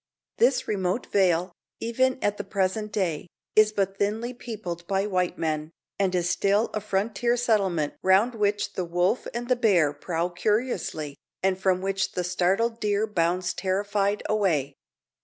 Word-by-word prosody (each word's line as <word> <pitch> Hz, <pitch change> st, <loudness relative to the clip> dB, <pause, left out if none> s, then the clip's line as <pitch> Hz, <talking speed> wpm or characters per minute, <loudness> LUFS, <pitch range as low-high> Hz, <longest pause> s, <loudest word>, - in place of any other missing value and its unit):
This 250 Hz, +2 st, +3 dB
remote 190 Hz, +2 st, -1 dB
vale, 180 Hz, -2 st, +2 dB, 0.3 s
even 255 Hz, +3 st, +1 dB
at 205 Hz, 0 st, +1 dB
the -, -, -3 dB
present 200 Hz, +2 st, -1 dB
day, 180 Hz, -6 st, -1 dB, 0.3 s
is 215 Hz, 0 st, +6 dB
but 195 Hz, -2 st, -1 dB
thinly 220 Hz, +4 st, -1 dB
peopled 190 Hz, -8 st, -6 dB
by 195 Hz, 0 st, +1 dB
white 185 Hz, -3 st, 0 dB
men, 155 Hz, -1 st, -2 dB, 0.3 s
and 190 Hz, -2 st, +1 dB
is 175 Hz, -1 st, +1 dB
still 200 Hz, +4 st, +2 dB
a 215 Hz, -, -2 dB
frontier 215 Hz, +4 st, 0 dB
settlement 195 Hz, -10 st, +1 dB
round 195 Hz, +6 st, +4 dB
which 205 Hz, -2 st, 0 dB
the 185 Hz, -, -2 dB
wolf 175 Hz, +7 st, 0 dB
and 240 Hz, +1 st, -4 dB
the 250 Hz, -, +3 dB
bear 185 Hz, -, +3 dB
prowl 170 Hz, +4 st, -2 dB
curiously, 180 Hz, -, -1 dB, 0.3 s
and 190 Hz, -1 st, +1 dB
from 185 Hz, -1 st, +2 dB
which 195 Hz, 0 st, -1 dB
the 180 Hz, -, -1 dB
startled 190 Hz, +6 st, +1 dB
deer 210 Hz, 0 st, +1 dB
bounds 180 Hz, -3 st, 0 dB
terrified 200 Hz, +2 st, 0 dB
away. 165 Hz, -10 st, +1 dB
195 Hz, 155 wpm, -26 LUFS, 180-215 Hz, 0.3 s, is